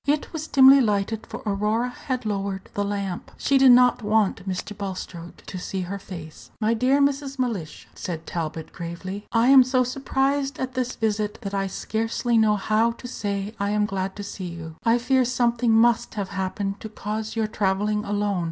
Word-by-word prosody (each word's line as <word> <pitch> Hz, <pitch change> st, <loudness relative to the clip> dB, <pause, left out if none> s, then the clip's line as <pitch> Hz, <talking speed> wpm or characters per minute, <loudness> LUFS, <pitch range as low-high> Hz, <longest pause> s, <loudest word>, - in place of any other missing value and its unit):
It 295 Hz, +3 st, 0 dB
was 315 Hz, -1 st, -4 dB
dimly 270 Hz, 0 st, +7 dB
lighted, 215 Hz, 0 st, 0 dB
for -, -, -8 dB
Aurora 210 Hz, +4 st, 0 dB
had 255 Hz, 0 st, -4 dB
lowered 195 Hz, -2 st, -3 dB
the 205 Hz, -, -1 dB
lamp. 200 Hz, -3 st, -3 dB
She 275 Hz, 0 st, +2 dB
did 265 Hz, -1 st, +7 dB
not 245 Hz, 0 st, +5 dB
want 210 Hz, -3 st, +1 dB
Mr. 190 Hz, +3 st, -4 dB
Bulstrode 185 Hz, -3 st, -6 dB
to 185 Hz, -, -6 dB
see 190 Hz, +1 st, -4 dB
her 195 Hz, +2 st, -4 dB
face. 170 Hz, -5 st, -10 dB
"My 220 Hz, 0 st, +2 dB
dear 255 Hz, +5 st, +3 dB
Mrs. 280 Hz, -1 st, 0 dB
Mellish," 220 Hz, -11 st, -3 dB
said 165 Hz, -2 st, -5 dB
Talbot, 160 Hz, -1 st, -5 dB
gravely, 185 Hz, +4 st, -6 dB
"I 230 Hz, +1 st, +3 dB
am 270 Hz, -1 st, +9 dB
so 255 Hz, 0 st, +2 dB
surprised 270 Hz, +2 st, -1 dB
at 260 Hz, 0 st, -3 dB
this 255 Hz, -1 st, -2 dB
visit 215 Hz, -1 st, -1 dB
that 200 Hz, -1 st, -5 dB
I 195 Hz, -1 st, 0 dB
scarcely 225 Hz, +4 st, -1 dB
know 220 Hz, -2 st, +4 dB
how 215 Hz, +3 st, +1 dB
to 245 Hz, -, -10 dB
say 200 Hz, -3 st, -3 dB
I 200 Hz, 0 st, 0 dB
am 210 Hz, 0 st, +2 dB
glad 190 Hz, -1 st, -3 dB
to 205 Hz, -, -6 dB
see 195 Hz, -2 st, -6 dB
you. 165 Hz, -2 st, -8 dB
I 230 Hz, +1 st, +4 dB
fear 255 Hz, +2 st, +2 dB
something 240 Hz, -1 st, +1 dB
must 230 Hz, +1 st, +3 dB
have 200 Hz, -3 st, -3 dB
happened 195 Hz, +1 st, -3 dB
to 220 Hz, -, -7 dB
cause 215 Hz, +1 st, -4 dB
your 225 Hz, -1 st, +1 dB
travelling 210 Hz, 0 st, 0 dB
alone. 205 Hz, -2 st, -1 dB
210 Hz, 190 wpm, -24 LUFS, 195-245 Hz, -, am